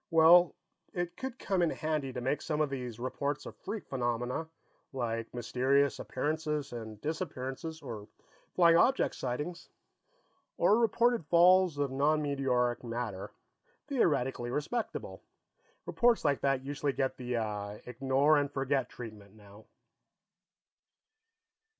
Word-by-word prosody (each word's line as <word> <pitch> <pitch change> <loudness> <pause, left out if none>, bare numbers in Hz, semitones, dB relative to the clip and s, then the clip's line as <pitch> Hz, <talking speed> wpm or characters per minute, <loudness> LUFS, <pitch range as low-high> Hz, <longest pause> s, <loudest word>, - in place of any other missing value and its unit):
Well, 165 +1 +6 0.4
it 175 -1 -2
would 265 -1 -4
come 190 -2 0
in 170 - +3
handy 155 -4 -2
to 125 - -5
make 135 +4 -1
some 155 -1 -2
of 150 -2 +1
these 125 -4 -5
reports 140 +3 -3
of - - -8
freak 210 +1 -6
phenomena, 125 +4 -2 0.5
like 115 -3 -3
mysterious 130 +4 +1
appearances 150 -2 -2
and 110 -3 -7
disappearances, 155 -1 -4
or 110 -6 -7 0.5
flying 170 -2 +6
object 260 +10 +3
sightings, 150 +8 -4 0.9
or 215 - +4
reported 235 -4 +2
falls 180 -1 +5
of 140 -2 0
non 145 +3 +2
meteoric 130 -5 0
matter, 115 -5 -4 0.6
theoretically 135 - 0
respectable. 150 - -3 0.6
Reports 240 -6 +2
like 140 -2 +2
that 135 -1 +1
usually 145 0 -1
get 135 -1 -1
the 105 -4 -3
ignore 135 +4 +2
and 145 0 -1
forget 135 -1 0
treatment, 105 -4 -10
now." 105 0 -16
140 Hz, 120 wpm, -31 LUFS, 125-160 Hz, 0.9 s, Well